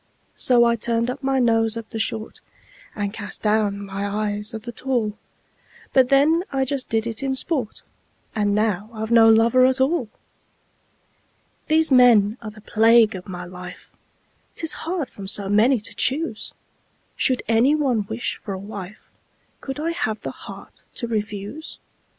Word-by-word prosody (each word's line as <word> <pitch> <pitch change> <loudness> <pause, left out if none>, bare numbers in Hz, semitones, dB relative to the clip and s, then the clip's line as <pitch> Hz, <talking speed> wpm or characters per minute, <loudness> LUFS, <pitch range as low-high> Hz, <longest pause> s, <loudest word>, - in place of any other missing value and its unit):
So 245 -2 +4
I 235 0 +3
turned 230 +2 0
up 280 - -8
my 270 -1 0
nose 225 -2 +2
at 225 -1 -8
the 225 - -4
short, 220 0 -2 0.5
And 205 -1 -3
cast 205 -2 -5
down 210 -2 +1
my 195 0 -5
eyes 210 +1 -2
at 220 -2 -7
the 240 - -6
tall; 235 -4 -2 0.8
But 260 -2 +4
then 300 +5 +4
I 270 -1 0
just 270 -1 -4
did 225 0 0
it 230 +2 -3
in 270 -1 -1
sport 265 -5 -3 0.5
And 205 -2 0
now 210 -1 0
I've 220 +1 -5
no 225 -1 +7
lover 230 +3 +5
at 260 +1 +3
all! 265 -3 +1 1.6
These 315 -1 +5
men 235 -4 +5
are 220 - -6
the 215 0 -14
plague 225 +1 +4
of 185 0 -8
my 180 -1 -6
life: 180 0 -10 0.6
'Tis 325 - -2 0.2
hard 345 -7 -2
from 195 -1 -10
so 195 0 0
many 225 +5 +4
to 210 - -7
choose! 280 -4 -1 0.6
Should 255 -1 +1
any 235 +6 +4
one 250 -9 0
wish 225 +2 -3
for 195 - -6
a - - -6
wife, 200 0 -9 0.5
Could 270 +1 -6
I 325 +2 -1
have 220 -10 -2
the - - -5
heart - - -12
to 235 - -3
refuse? 210 +5 -5
225 Hz, 165 wpm, -22 LUFS, 210-260 Hz, 1.6 s, no